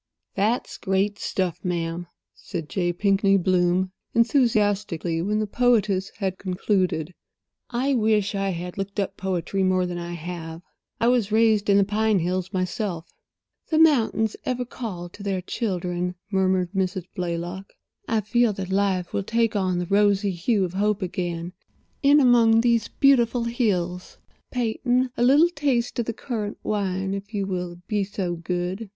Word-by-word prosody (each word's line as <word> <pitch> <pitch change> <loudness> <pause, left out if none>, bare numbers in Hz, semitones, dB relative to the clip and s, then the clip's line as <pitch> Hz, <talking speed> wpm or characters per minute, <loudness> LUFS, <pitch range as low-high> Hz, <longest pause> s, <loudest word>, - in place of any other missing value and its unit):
"That's 215 +5 -1
great 195 +2 0
stuff, 180 -3 -2
ma'am," 170 -1 -2 0.3
said 165 -6 -7
J. 175 -3 0
Pinkney 195 +2 +3
Bloom, 180 0 +2 0.2
enthusiastically, 205 - +2
when 210 +4 0
the 215 - 0
poetess 210 -4 +2
had 190 -2 -2
concluded. 185 -3 -1 0.6
"I 260 +3 0
wish 215 -4 +2
I 195 -1 -1
had 180 +1 -5
looked 200 +1 -4
up 195 0 -2
poetry 190 0 -2
more 185 -1 +2
than 175 -1 -4
I 170 0 -5
have. 170 0 -7 0.4
I 230 - +2
was 240 -4 +2
raised 220 -2 +3
in 200 - +6
the 200 - +5
pine 215 +1 +1
hills 180 +1 -1
myself." 185 -2 -3 0.6
"The 315 - +1
mountains 235 -8 +3
ever 250 -1 -2
call 210 -8 -6
to 200 - -13
their 195 -2 -1
children," 180 -3 -2 0.2
murmured 185 -2 +1
Mrs. 185 -2 -1
Blaylock. 180 +1 -4 0.4
"I 220 -1 +1
feel 235 +1 +2
that 190 -1 -5
life 190 -2 0
will - - 0
take 230 +2 0
on 185 -3 +1
the 175 - -1
rosy 200 +1 +2
hue 190 +3 +1
of 175 - -6
hope 205 +1 0
again 175 -1 -3 0.5
in 285 +1 +6
among 235 -4 +5
these 235 -2 +2
beautiful 245 -4 +3
hills. 185 -7 -1 0.3
Peyton—a 250 +1 0
little 285 +7 +6
taste 270 -8 -1
of 235 - -1
the 230 - -1
currant 215 -4 -4
wine, 195 -2 -1
if 200 +2 -6
you 200 -1 0
will 180 -2 -4
be 210 -2 0
so 190 -3 -3
good. 180 +5 -3
195 Hz, 155 wpm, -24 LUFS, 180-225 Hz, 0.6 s, in